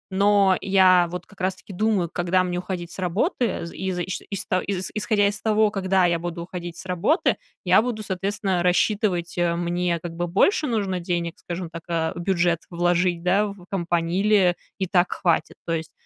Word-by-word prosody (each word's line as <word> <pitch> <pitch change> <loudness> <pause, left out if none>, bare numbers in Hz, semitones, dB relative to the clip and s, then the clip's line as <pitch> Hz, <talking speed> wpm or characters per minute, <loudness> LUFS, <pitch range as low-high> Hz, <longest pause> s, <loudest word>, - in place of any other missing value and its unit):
Но 200 -1 +4
я 185 -2 +5
вот 180 +1 -6
как 200 -2 -15
раз 185 +1 0
таки 200 - -12
думаю, 205 -2 +1
когда 180 +1 +1
мне 180 -1 -2
уходить 180 -2 -5
с - - -9
работы, 205 - 0
из 190 +1 -3
иш 180 +1 -3
ишта 190 -2 -1
из 190 -2 -3
исходя 210 -1 +2
из 205 0 -3
того, 215 -1 +3
когда 190 -2 +2
я 170 -1 +1
буду 170 0 -5
уходить 175 -1 -7
с - - -9
работы, 185 - +1 0.3
я 185 +3 +6
буду, 225 -2 -3
соответственно, 195 -1 -1
рассчитывать, 180 -1 +1
э, 170 -1 +2
мне, 175 0 -1
как 170 +1 -7
бы, 175 +1 -2
больше 295 - +2
нужно 200 -6 -1
денег, 170 -1 -3
скажем 175 -1 -5
так, 165 0 -8
э, 165 -2 0
в - - -6
бюджет 175 -2 +1
вложить, 175 0 +1
да, 195 +4 +3
в 200 -3 -10
компании- 175 -1 0
или 200 -4 +4 0.2
и 190 - -1
так 180 0 +2
хватит. 170 -3 0
То 165 - -1
есть, 160 -1 -3
180 Hz, 190 wpm, -24 LUFS, 175-200 Hz, 0.3 s, я